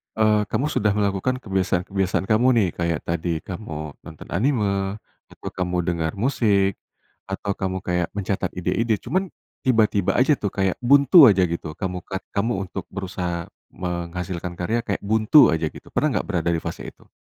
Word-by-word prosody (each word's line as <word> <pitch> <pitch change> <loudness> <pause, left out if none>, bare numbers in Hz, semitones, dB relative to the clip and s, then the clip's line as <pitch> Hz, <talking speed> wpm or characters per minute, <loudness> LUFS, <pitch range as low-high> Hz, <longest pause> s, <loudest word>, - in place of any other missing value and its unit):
eee, 105 -1 +3
kamu 135 - -1
sudah 105 -7 +1
melakukan 100 +4 0
kebiasaan-kebiasaan 95 -1 0
kamu 120 +4 +4
nih, 105 -5 +3
kayak 85 -2 0
tadi 85 -1 -2
kamu 80 -6 -6
nonton 80 -2 -12
anime, 100 -3 0 0.3
atau - - -8
kamu 90 -1 -2
dengar 85 -2 -2
musik, 100 -5 +1 0.5
atau 95 +1 -3
kamu 95 -1 -2
kayak 90 -1 0
mencatat 95 -2 -2
ide-ide, 100 +6 0
cuman, 190 +1 -1 0.4
tiba-tiba 105 -5 +3
aja 130 +4 +4
tuh 105 - -1
kayak 95 -2 0
buntu 140 +4 +7
aja 95 -4 +4
gitu 85 -3 -3
kamu 90 -1 -3
kat 95 - -5
kamu 110 +4 0 0.2
untuk 95 - -6
berusaha 90 -3 -4 0.2
menghasilkan 90 0 -4
karya 110 +7 -1
kayak 100 -2 -3
buntu 110 +7 +5
aja 80 -1 0
gitu, - - -11
pernah - - +1
nggak - - -6
berada 85 - 0
di - - -1
fase - - -6
itu? - - -13
95 Hz, 160 wpm, -23 LUFS, 90-110 Hz, 0.5 s, buntu